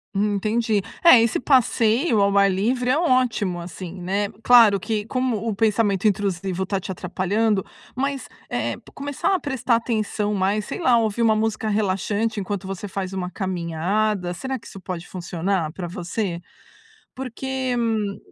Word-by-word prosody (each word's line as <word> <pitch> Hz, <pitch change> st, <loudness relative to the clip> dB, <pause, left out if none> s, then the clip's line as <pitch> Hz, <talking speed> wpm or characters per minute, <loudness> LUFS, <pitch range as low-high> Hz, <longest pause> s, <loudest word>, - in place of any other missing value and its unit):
Hum, 205 Hz, +1 st, +1 dB
entendi. 215 Hz, +1 st, +1 dB, 0.2 s
É, 335 Hz, -8 st, +9 dB
esse 230 Hz, -, +1 dB
passeio 245 Hz, -2 st, +3 dB
ao 200 Hz, 0 st, +3 dB
ar 200 Hz, 0 st, +5 dB
livre 245 Hz, +6 st, +1 dB
é 275 Hz, -, +3 dB
ótimo, 250 Hz, -, +1 dB
assim, 180 Hz, +1 st, -8 dB
né. 195 Hz, +3 st, -1 dB, 0.2 s
Claro 230 Hz, -5 st, +7 dB
que, 210 Hz, +2 st, -2 dB
como 255 Hz, -1 st, 0 dB
o 220 Hz, -, -1 dB
pensamento 210 Hz, -2 st, +2 dB
intrusivo 190 Hz, -2 st, -1 dB
está 195 Hz, +1 st, -1 dB
te 190 Hz, +1 st, -6 dB
atrapalhando 195 Hz, +3 st, 0 dB, 0.3 s
mas, 275 Hz, +1 st, -2 dB, 0.2 s
eh -, -, -1 dB
eh, -, -, -8 dB, 0.2 s
começar 285 Hz, +6 st, -1 dB
a 375 Hz, -, +2 dB
prestar 265 Hz, -5 st, 0 dB
atenção 215 Hz, -2 st, -1 dB
mais, 200 Hz, +2 st, 0 dB
sei -, -, -5 dB
lá, 255 Hz, -8 st, +4 dB
ouvir 220 Hz, 0 st, -1 dB
uma 220 Hz, -1 st, +4 dB
música 220 Hz, 0 st, -1 dB
relaxante 210 Hz, +1 st, 0 dB
enquanto 195 Hz, -1 st, -4 dB
você 195 Hz, +1 st, -5 dB
faz 190 Hz, -1 st, -4 dB
uma 185 Hz, -2 st, -3 dB
caminhada. 185 Hz, +1 st, -1 dB
Será 265 Hz, +7 st, -4 dB
que -, -, -14 dB
isso 195 Hz, -, -10 dB
pode 180 Hz, -2 st, -6 dB
funcionar 180 Hz, -2 st, -2 dB
pra 180 Hz, -1 st, -5 dB
você? 180 Hz, 0 st, -3 dB, 0.8 s
Porque, 260 Hz, 0 st, -3 dB
hum, 215 Hz, -4 st, -1 dB
210 Hz, 160 wpm, -23 LUFS, 190-230 Hz, 0.8 s, É